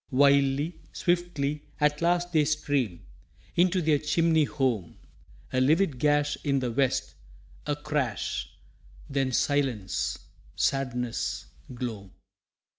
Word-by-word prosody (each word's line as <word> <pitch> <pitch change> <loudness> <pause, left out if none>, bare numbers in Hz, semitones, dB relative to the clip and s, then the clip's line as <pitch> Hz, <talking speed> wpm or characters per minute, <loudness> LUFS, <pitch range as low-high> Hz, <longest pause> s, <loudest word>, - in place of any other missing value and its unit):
Wildly, 140 +3 +3
swiftly, 170 -5 0 0.2
at 150 0 +2
last 175 +1 +1
they 155 -2 +5
stream 145 - -1 0.5
Into 180 +1 +3
their 150 -2 +3
chimney 160 +1 +3
home. 130 - -1 0.6
A 130 - +2
livid 155 0 +3
gash 145 0 +2
in 140 -2 +1
the 125 -2 -1
west, 130 +2 0 0.5
a 145 - +1
crash 135 - -2 0.6
Then 135 -2 0
silence, 120 - 0 0.4
sadness, 125 -3 -1 0.3
gloam. 110 -6 -5
140 Hz, 105 wpm, -27 LUFS, 130-155 Hz, 0.6 s, they